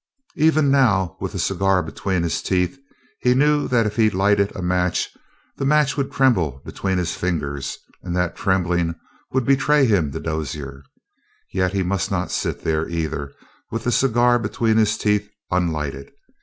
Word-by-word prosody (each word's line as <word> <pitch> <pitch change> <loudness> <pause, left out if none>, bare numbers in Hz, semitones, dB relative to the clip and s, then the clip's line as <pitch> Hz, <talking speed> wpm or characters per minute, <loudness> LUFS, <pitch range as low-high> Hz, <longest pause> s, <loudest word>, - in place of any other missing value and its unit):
Even 155 -2 +3
now, 110 -10 +3
with - - -4
the - - -4
cigar 95 -2 +1
between 90 +2 -2
his 80 -3 -1
teeth, 90 +8 0 0.4
he 125 0 +3
knew 150 +2 +3
that 115 -3 +2
if 105 +1 -3
he 110 -1 +5
lighted 100 +1 +2
a - - -5
match, 90 0 0 0.4
the - - -3
match 150 0 +3
would 140 -2 -2
tremble 90 - +2
between 95 -1 -2
his 85 -1 -1
fingers, 70 -6 -3 0.2
and 90 -1 -4
that 90 -1 0
trembling 90 -3 0 0.4
would 130 -2 0
betray 140 +1 +4
him 95 - +2
to - - -5
Dozier. 75 -3 -4 0.7
Yet 95 0 0
he 95 -1 +1
must 95 +2 -1
not 95 -3 -2
sit - - -2
there, 80 0 0
either, 80 -4 -3 0.4
with 115 0 -4
the 125 - 0
cigar 120 0 +3
between 115 -1 0
his 110 0 +3
teeth, 105 0 0 0.2
unlighted. 75 -6 -2
95 Hz, 165 wpm, -22 LUFS, 85-120 Hz, 0.7 s, he